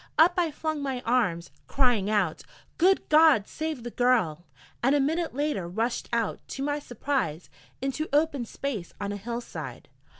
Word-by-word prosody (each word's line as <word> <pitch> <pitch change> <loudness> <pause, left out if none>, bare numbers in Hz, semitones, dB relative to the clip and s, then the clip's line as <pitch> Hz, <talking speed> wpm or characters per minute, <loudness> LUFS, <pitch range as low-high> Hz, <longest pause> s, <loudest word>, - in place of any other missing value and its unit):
Up 335 +3 +7
I 345 -2 +2
flung 310 0 -3
my 265 -3 -2
arms, 185 -10 0 0.2
crying 245 -7 +2
out: 200 -7 +1 0.4
'Good 380 +3 +4
God! 305 -9 +6
save 315 -6 -4
the 240 - -5
girl!' 215 -11 +1 0.3
and 270 +4 +3
a - - +3
minute 320 +2 0
later 285 - -1
rushed 225 +7 -2
out, 230 -2 0
to 270 - -5
my 290 +1 0
surprise, 245 - -2 0.3
into 275 +4 -2
open 290 -3 +2
space 225 -7 -5
on 200 0 -3
a 205 - -3
hill 235 +4 -4
side. - - -8
255 Hz, 165 wpm, -27 LUFS, 210-295 Hz, 0.4 s, Up